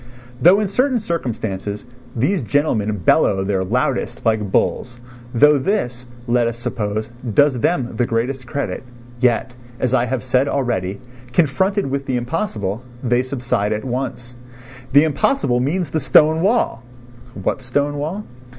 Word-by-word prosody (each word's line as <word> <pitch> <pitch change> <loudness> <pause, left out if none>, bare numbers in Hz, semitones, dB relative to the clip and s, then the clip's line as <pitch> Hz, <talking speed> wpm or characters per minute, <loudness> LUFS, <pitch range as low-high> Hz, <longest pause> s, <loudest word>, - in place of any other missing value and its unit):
Though 180 +8 +7
in 210 - 0
certain 255 +6 +1
circumstances 110 - -3 0.3
these 155 - +1
gentlemen 110 -4 0
bellow 95 +2 +3
their 95 -1 0
loudest 125 +8 -1
like 110 -3 +1
bulls, 120 +4 0 0.3
though 145 +4 +5
this, 125 - -2 0.2
let 120 -1 +2
us 115 0 -3
suppose, 110 -2 -3 0.2
does 145 -3 +4
them 120 -5 0
the 120 - +1
greatest 125 +3 -2
credit, 140 +4 -3 0.4
yet, 125 0 +1 0.3
as 130 -1 0
I 125 -2 +3
have 125 0 -2
said 130 +2 +2
already, 105 -9 -1 0.3
confronted 190 +6 +2
with 135 0 -3
the 130 - 0
impossible 120 - -2 0.2
they 120 0 +2
subside 120 -5 -1
at 105 +3 -4
once. 125 -1 -4 0.6
The 140 +2 +7
impossible 150 - +1
means 150 +4 -1
the 160 - 0
stone 155 +4 +4
wall! 205 - +1 0.5
What 100 +6 -2
stone 145 +4 -1
wall? 170 +8 -3
125 Hz, 140 wpm, -20 LUFS, 115-145 Hz, 0.6 s, Though